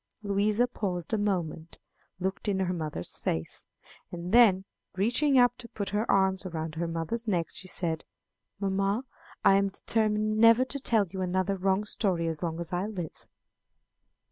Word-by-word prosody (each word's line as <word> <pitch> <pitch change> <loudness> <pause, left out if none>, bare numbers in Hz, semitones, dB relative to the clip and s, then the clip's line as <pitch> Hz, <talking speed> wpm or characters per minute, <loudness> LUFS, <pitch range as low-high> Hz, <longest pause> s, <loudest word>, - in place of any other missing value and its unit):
Louisa 205 +3 +2
paused 190 -6 -4
a - - +3
moment, 170 -5 -2 0.4
looked 190 +3 -3
in 195 -2 +1
her 180 -1 0
mother's 155 - -3
face, 80 0 -3 0.4
and 175 +1 -5
then, 200 -6 +6 0.3
reaching 250 +8 +2
up 245 -1 +5
to 240 - -7
put 200 -2 -4
her 210 +3 -1
arms 190 -1 +3
around 160 -3 -4
her 170 +1 -2
mother's 165 +8 -3
neck, 175 -5 0
she 185 - -5
said, 165 -3 -2 0.6
"Mamma, 195 +3 0 0.4
I 195 - +7
am 200 0 +2
determined 215 +1 0
never 230 +3 +6
to 280 +2 -3
tell 225 -5 +2
you 190 +1 -6
another 185 +2 0
wrong 190 +1 +1
story 190 -5 0
as 160 -2 -3
long 165 -1 -3
as 170 0 -4
I 180 +3 -1
live." 180 -7 -7
195 Hz, 165 wpm, -28 LUFS, 175-215 Hz, 0.6 s, I